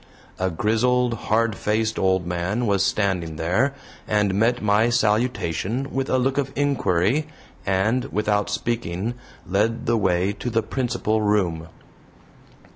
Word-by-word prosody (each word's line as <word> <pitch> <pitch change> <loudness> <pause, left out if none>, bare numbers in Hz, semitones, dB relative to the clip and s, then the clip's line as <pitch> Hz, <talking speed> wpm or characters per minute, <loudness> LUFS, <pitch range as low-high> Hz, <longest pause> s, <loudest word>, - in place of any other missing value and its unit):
A 95 0 +1
grizzled, 120 +7 +1
hard 115 -1 0
faced 110 +2 -1
old 95 -2 +2
man 90 +7 -1
was 100 -3 +2
standing 90 -6 0
there, 90 - +1 0.3
and 105 -2 +1
met 115 +5 +2
my 105 +2 +3
salutation 120 0 0
with 135 0 -1
a 130 - +2
look 130 +2 +1
of 135 -1 -2
inquiry, 140 - +1 0.4
and, 110 +6 +1
without 105 -1 0
speaking, 105 -1 -2 0.3
led 105 +5 0
the 115 0 +2
way 95 -1 +1
to 125 - -2
the 115 -1 0
principal 120 -3 -1
room. 90 -6 0
105 Hz, 130 wpm, -23 LUFS, 95-120 Hz, 0.4 s, my